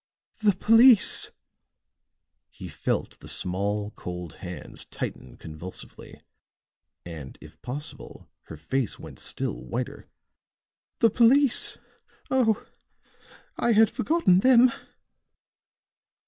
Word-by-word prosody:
"The 205 -3 +3
police!" 225 +2 +5 1.2
He - - -10
felt - - -3
the - - -13
small, 100 +3 -2
cold 90 -4 -8
hands 90 -1 -5
tighten 65 -1 -7
convulsively, 80 +4 -10 0.9
and, 80 -6 -9
if 80 +1 -15
possible, 140 +4 -8 0.2
her 80 - -10
face 120 - -2
went - - -11
still - - -4
whiter. 65 - -5 0.9
"The 230 - +5
police! 250 +4 +4 0.5
Oh! 230 -5 +2 0.9
I 235 0 +2
had 220 0 +5
forgotten 245 - +2
them." 250 +2 +6
145 Hz, 90 wpm, -26 LUFS, -, 1.2 s, them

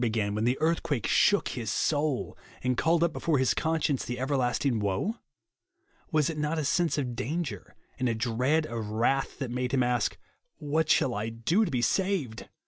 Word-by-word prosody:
began 110 -4 0
when 105 +2 -1
the 125 +2 +2
earthquake 155 -5 0
shook 205 -1 +3
his 115 -5 -4
soul, 145 +1 0 0.3
and 125 0 +1
called 165 +5 +2
up 170 -2 +1
before 165 -3 0
his 130 -1 +2
conscience 160 -4 0
the 120 - -4
everlasting 130 -2 0
woe? 105 - -1 0.9
"Was 155 -3 +3
it 160 -2 -3
not 150 +2 -1
a 155 - -1
sense 165 0 +1
of 125 -4 -2
danger 130 - -4 0.2
and 125 - +1
a 115 - 0
dread 125 +7 +1
of 115 -5 -4
wrath 120 +5 0
that 135 -4 -4
made 125 +1 -2
him 130 - +3
a^k, 125 0 +1 0.3
" - - -51
What 155 +1 0
shall 125 - +3
I 110 +1 -2
do 140 - +1
to - - -3
be 125 -3 -1
saved 185 - -1
130 Hz, 190 wpm, -28 LUFS, 120-160 Hz, 0.9 s, shook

